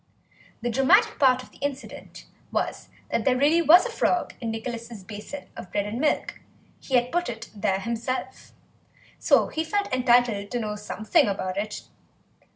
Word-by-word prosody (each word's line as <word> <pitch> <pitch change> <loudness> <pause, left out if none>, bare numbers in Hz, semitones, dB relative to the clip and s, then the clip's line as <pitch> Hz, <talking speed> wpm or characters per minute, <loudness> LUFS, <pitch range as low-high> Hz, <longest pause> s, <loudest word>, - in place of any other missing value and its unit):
The 240 - 0
dramatic 395 - +4
part 255 -2 +4
of - - -17
the - - -20
incident 280 -1 -6 0.3
was - - -3 0.2
that - - 0
there 260 -2 +2
really 300 +5 +4
was 335 - +7
a - - -3
frog 365 -5 0
in 230 - -3
Nicholas' 230 -1 -6
basin 210 +8 -8
of 180 - -9
bread 205 -1 0
and 215 +4 -4
milk; 300 +2 0 0.4
he 265 - -2
had 245 0 +2
put 350 +1 0
it 230 -1 -7
there 195 -1 0
himself, 235 +3 -4 0.7
so - - +3
he 320 - -2
felt 405 -1 -2
entitled 240 -5 +3
to 245 - -2
know 210 -2 -3
something 215 +7 +1
about 185 -2 -2
it. 210 +2 -4
245 Hz, 165 wpm, -25 LUFS, 215-285 Hz, 0.7 s, was